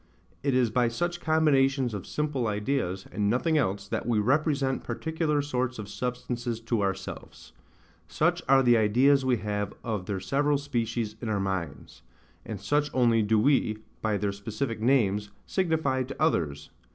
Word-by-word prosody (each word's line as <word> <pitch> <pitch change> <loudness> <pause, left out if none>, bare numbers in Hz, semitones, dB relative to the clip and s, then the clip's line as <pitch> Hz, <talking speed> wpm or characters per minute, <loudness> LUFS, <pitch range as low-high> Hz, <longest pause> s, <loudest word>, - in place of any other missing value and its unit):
It 140 -2 +1
is 125 -3 +3
by 120 +1 +2
such 175 +8 -2
combinations 135 -5 +2
of 100 -3 -6
simple 145 -6 -1
ideas, 105 -3 -1
and 100 0 0
nothing 145 +8 +1
else, 100 -9 0
that - - -3
we 120 -2 +2
represent 135 +3 +1
particular 160 -2 -1
sorts 130 -3 -2
of 105 -2 -6
substances 120 +2 -3
to 115 -1 -1
ourselves; 95 -1 -5 0.5
such - - +1
are 135 0 +6
the 120 -1 +5
ideas 130 +6 +4
we 130 -2 +2
have 105 -1 -3
of 105 -5 -3
their 100 -2 -2
several 140 +10 +1
species 115 -6 -2
in 115 - -3
our 105 -2 0
minds; 95 -6 -4 0.4
and 110 -4 -6
such 145 +9 +1
only 120 -3 +4
do 110 +1 +2
we, 110 -3 +2 0.2
by 110 -2 0
their 100 0 -1
specific 110 +4 -4
names, 105 -5 +2 0.2
signify 160 -8 0
to 130 +2 -6
others, 80 - 0
v. - - -33
120 Hz, 165 wpm, -27 LUFS, 105-140 Hz, 0.5 s, are